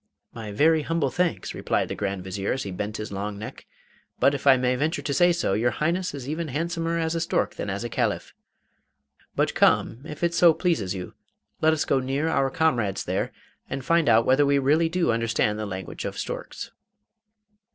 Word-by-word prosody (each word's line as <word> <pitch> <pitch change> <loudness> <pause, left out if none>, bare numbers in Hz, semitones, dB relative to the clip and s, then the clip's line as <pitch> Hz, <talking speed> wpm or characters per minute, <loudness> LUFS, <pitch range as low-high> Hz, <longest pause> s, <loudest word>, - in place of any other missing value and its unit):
'My 110 -2 -7
very 155 +9 +4
humble 150 -3 0
thanks,' 180 -1 -1
replied - - -1
the - - -4
Grand 100 -2 -3
Vizier, 95 +1 -2
as 135 - -3
he 100 - -5
bent 105 +3 -4
his 110 - -6
long 100 +1 -4
neck; 110 - -9 0.5
'but, 140 - +4
if 140 0 -3
I 135 -1 +8
may 125 0 +1
venture 155 +6 -1
to 140 - -1
say 175 +3 +5
so, 170 - 0
your 115 +4 +2
Highness 170 +6 -1
is 135 -2 -7
even 160 +3 -3
handsomer 165 +3 -2
as 160 0 0
a 165 - -1
stork 165 - 0
than - - -5
as - - -3
a - - -2
Caliph. - - -1 1.0
But - - +1
come, 115 - +2
if 155 +1 -8
it 170 0 +2
so 170 -1 +6
pleases 160 - 0
you, 90 -1 -6 0.5
let 160 - +5
us 155 -1 0
go 135 - +2
near 135 +5 -1
our 135 -4 +2
comrades 120 -10 +1
there - - -2 0.4
and 135 -1 -4
find 170 -5 +3
out 115 0 +5
whether 130 +3 +4
we 140 0 +3
really 150 +5 +3
do 170 -5 +1
understand 115 -2 0
the 110 - -3
language 95 -3 -6
of - - -4
storks. - - -5
140 Hz, 205 wpm, -25 LUFS, 110-165 Hz, 1.0 s, I